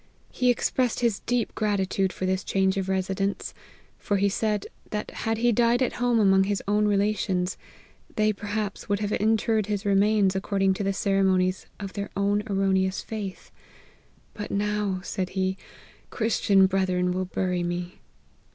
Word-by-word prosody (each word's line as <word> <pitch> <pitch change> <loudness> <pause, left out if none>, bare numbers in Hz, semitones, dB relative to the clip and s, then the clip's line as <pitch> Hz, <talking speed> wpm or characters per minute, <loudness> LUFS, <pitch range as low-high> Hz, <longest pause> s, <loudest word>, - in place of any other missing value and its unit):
He 250 -1 +1
expressed 245 0 +1
his 230 -4 +1
deep 245 -2 0
gratitude 195 -3 0
for 185 - -4
this 185 0 0
change 190 0 +1
of 195 -1 -2
residence; 190 +1 -1 0.5
for 205 - 0
he 200 +1 +2
said, 210 0 -1 0.2
that 210 -1 -4
had 225 -1 -2
he 240 +2 +3
died 240 +2 +3
at - - -1
home 245 -1 +3
among 195 -2 +4
his 200 -1 -1
own 210 +1 +2
relations, 200 -3 0 0.6
they 215 0 +2
per 205 +1 -9
haps 205 -1 -3
would 205 - +2
have 205 -1 -2
interred 220 0 +1
his 205 0 -2
remains 200 -1 +3
according 195 0 +1
to 195 - -3
the 195 - +1
ceremonies 190 -1 +1
of 195 -2 -6
their 200 -1 -4
own 200 +1 +2
erroneous 190 -1 +1
faith: 205 -4 -6 0.4
* - - -34
But 210 - -6
now,' 205 -2 -1
said 185 0 -4
he, 190 0 +1 0.3
' - - -26
Christian 210 -4 +3
brethren 185 -1 +1
will 185 +1 -1
bury 180 -1 -1
me.' 175 +1 -4
200 Hz, 165 wpm, -26 LUFS, 190-210 Hz, 0.6 s, among